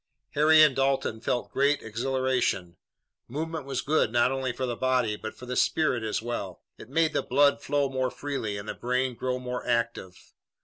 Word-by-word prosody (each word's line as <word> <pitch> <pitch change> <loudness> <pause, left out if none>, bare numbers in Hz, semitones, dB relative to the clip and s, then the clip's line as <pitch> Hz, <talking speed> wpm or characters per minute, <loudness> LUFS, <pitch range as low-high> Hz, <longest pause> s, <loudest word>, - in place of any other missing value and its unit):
Harry 155 +1 +6
and 150 -4 +4
Dalton 135 -4 0
felt 120 +1 -2
great 140 +1 +2
exhilaration. 125 -6 -1 0.5
Movement 155 +2 -4
was 135 -2 -2
good 150 -6 +1
not 120 +2 +3
only 135 -1 -1
for 130 +2 -3
the 120 -1 -2
body, 125 -4 +1
but 110 +1 -7
for 125 - -11
the 125 0 -4
spirit 140 -6 +2
as 110 0 -2
well. 100 -7 -5 0.2
It - - -11
made 160 +2 +2
the - - +1
blood 140 +2 +3
flow 145 0 +1
more 130 -1 -1
freely 125 -8 -4
and 100 +1 -7
the - - -3
brain 125 +1 -1
grow 125 +2 -2
more 125 0 -5
active. 115 -6 -2
130 Hz, 185 wpm, -27 LUFS, 120-140 Hz, 0.5 s, Harry